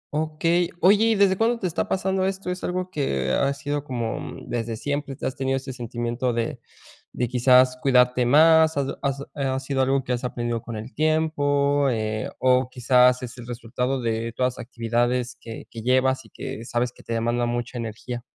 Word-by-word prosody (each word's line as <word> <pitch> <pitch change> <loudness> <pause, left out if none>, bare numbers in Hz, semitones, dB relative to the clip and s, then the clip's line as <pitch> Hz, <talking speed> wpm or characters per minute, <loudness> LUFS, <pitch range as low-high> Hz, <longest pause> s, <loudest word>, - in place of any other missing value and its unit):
Okey, 165 +3 +1
oye, 205 +4 +5
¿y 225 -1 +3
desde 195 -2 +3
cuándo 235 +2 +2
te 215 - -5
está 170 -2 -1
pasando 190 0 0
esto? 190 -1 -3
¿Es 180 - -6
algo 185 +1 -2
que 70 - -1
ha 140 0 +2
sido 145 0 -3
como 120 -5 -4
desde 115 -1 -3
siempre 145 +1 -3
te - - -7
has 130 - -2
tenido 135 0 0
ese 130 0 -6
sentimiento 120 0 -2
de 115 0 -2 0.5
de 125 - -1
quizás 125 +1 +4
cuidarte 125 -2 +4
más? 160 +3 +6
¿Has 140 -1 0
has 140 0 -2
ha 135 -2 -1
sido 135 0 -1
algo 135 +1 +2
que 125 - -2
has 120 - -3
aprendido 120 -2 -2
con 115 - -7
el 110 +4 -7
tiempo, 145 -2 +2
eh, 110 -2 -2
o 130 0 +3
quizás 125 0 +3
es 125 -1 -7
el 120 - -9
resultado 125 +2 -3
de 115 0 -1
todas 125 +1 0
las - - -12
actividades 120 +1 -1
que 115 -1 -8
que 115 - -7
llevas 130 +2 +2
y - - -17
que 135 -3 -7
sabes 120 +1 -1
que - - -18
te 115 - -5
demandan 120 +1 0
mucha 120 +1 -3
energía? 115 +2 -5
130 Hz, 195 wpm, -24 LUFS, 120-145 Hz, 0.5 s, más